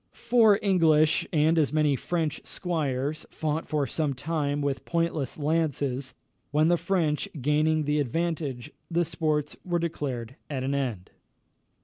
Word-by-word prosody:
Four 220 -4 +4
English 160 -6 +4
and 160 +1 +3
as 150 - +2
many 150 -2 +3
French 160 +1 -2
squires 150 -4 -2
fought 155 0 -2
for 150 -2 0
some 145 -1 -1
time 145 0 -1
with 140 -2 -1
pointless 165 -5 -1
lances, 145 -4 -1 0.3
when 155 +3 +3
the 175 - +5
French 165 -6 0
gaining 155 +3 +2
the 150 +1 +1
advantage, 150 -2 -2 0.2
the 170 0 +1
sports 155 -2 -1
were 175 -1 0
declared 135 -7 -3
at 135 -3 -3
an 135 +1 -1
end. 120 -10 -3
150 Hz, 135 wpm, -27 LUFS, 140-165 Hz, 0.3 s, the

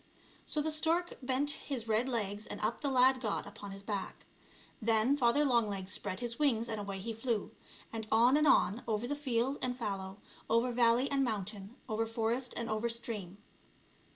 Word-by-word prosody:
So 300 - +1
the 315 - 0
stork 330 +3 +1
bent 265 +3 0
his 255 -6 -4
red 225 +4 +2
legs 210 -3 -2
and - - -5
up 215 +2 -1
the 285 - 0
lad 260 0 +4
got 215 -5 -1
upon 205 0 -9
his 195 0 -8
back. 200 -1 -4 0.6
Then 225 +4 +3
Father 280 +2 +3
Long 235 -5 +3
legs 195 -1 -4
spread 185 +2 -3
his 240 +1 -3
wings 240 -6 +2
and 220 -2 -3
away 200 -1 -4
he 225 +4 -4
flew, 225 -2 -2 0.4
and 220 -1 -4
on 235 +4 +5
and 300 0 +4
on, 205 -3 +4
over 220 +1 -1
field 270 -2 0
and 250 -1 -2
fallow, 195 -4 -4 0.3
over 230 +2 +3
valley 240 +2 +4
and 275 -1 +2
mountain, 210 -2 -4
over 225 +1 -1
forest 230 +3 -1
and 235 - -2
over 215 +2 -1
stream. 215 -5 -5
230 Hz, 180 wpm, -33 LUFS, 215-255 Hz, 0.6 s, on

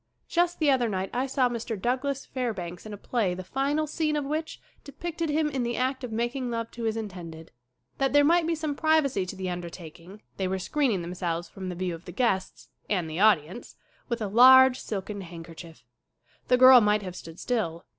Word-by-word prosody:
Just 345 0 +1
the 300 -3 +3
other 245 -3 +2
night 190 -1 -3
I 255 +2 -1
saw 260 -1 +2
Mr. 230 -3 -4
Douglas 260 +5 -1
Fair 250 -4 -3
banks 175 +2 -7
in - - -8
a - - -6
play 205 -4 -1
the 185 - -7
final 280 +9 -1
scene 305 0 -1
of 295 -2 -1
which 310 +3 -4 0.2
de 285 - -11
picted 335 +2 -4
him 305 +1 +1
in 270 -3 -2
the 240 0 -2
act 260 +1 -1
of 245 - -5
making 240 +3 -2
love 230 -1 -3
to 235 -1 -6
his 220 0 -1
in 220 -1 -3
tended. 165 -4 -10 0.5
That 270 -1 +1
there 290 0 +5
might 335 +1 +3
be 335 - +1
some 310 -2 -3
privacy 280 - +1
to 190 - -6
the 185 -1 -4
undertaking 175 +2 -9
they 190 - -1
were 190 +1 -1
screening 225 - 0
them 175 +1 -6
selves 175 -2 -3
from 190 -1 -7
the 180 - -5
view 180 0 -2
of 165 +2 -10
the - - -8
guests 195 -7 -1 0.2
and 180 -5 0
the 160 +2 -5
audience! 195 -1 +2 0.3
with 235 -2 -2
a - - -1
large 255 +4 +7
silken 205 0 -5
handkerchief. 165 -2 -11 0.6
The 250 - +4
girl 255 -1 +9
might 210 0 +2
have 180 -2 -7
stood 165 -1 -10
still. 175 -9 -2
230 Hz, 215 wpm, -27 LUFS, 185-270 Hz, 0.6 s, girl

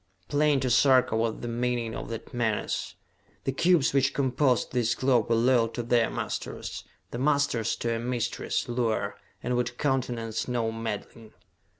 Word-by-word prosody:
Plain 145 -1 +3
to 130 - 0
Sarka 130 -2 +4
was 115 0 -1
the 120 - -4
meaning 120 -1 -1
of - - -6
that 115 -1 -7
menace: 115 -3 -1 0.5
The 135 - 0
cubes 165 +1 +3
which 135 0 +2
composed 130 -1 +1
this 120 -1 +1
globe 125 -4 +2
were 115 - +4
loyal 120 0 +4
to 120 +1 -5
their 120 -1 +2
masters, - - -5 0.3
the 120 - -4
masters 140 -5 +1
to 115 0 -2
a 115 - -2
mistress, 120 0 -2
Luar, 115 -4 -1 0.3
and 125 +1 0
would 120 0 -1
countenance 120 -5 -1
no 120 -2 0
meddling. 110 0 -6
120 Hz, 160 wpm, -27 LUFS, 115-130 Hz, 0.5 s, Sarka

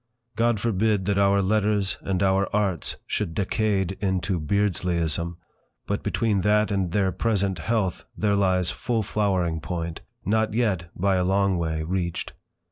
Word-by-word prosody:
God 115 -2 +2
forbid 105 -2 +1
that 100 0 +1
our 100 0 +4
Letters 105 -1 +1
and 95 -1 -1
our 95 0 +2
Arts 100 -6 0
should 85 -6 -2
decade 100 -2 0
into 95 -2 0
Beardsleyism; 85 -2 0 0.5
but - - -2
between 105 -4 0
that 105 +2 +2
and 95 -3 0
their 95 -1 +2
present 100 -1 0
"health" 100 0 -1
there 105 -1 +2
lies 95 -3 +2
full 115 -3 -1
flowering 95 -6 0
point, 85 0 -4 0.2
not 110 +1 +1
yet, 95 -8 0
by 95 +1 +2
a 90 - +2
long 95 0 +2
way, 80 -1 -1
reached. 85 0 -3
95 Hz, 145 wpm, -25 LUFS, 90-105 Hz, 0.5 s, our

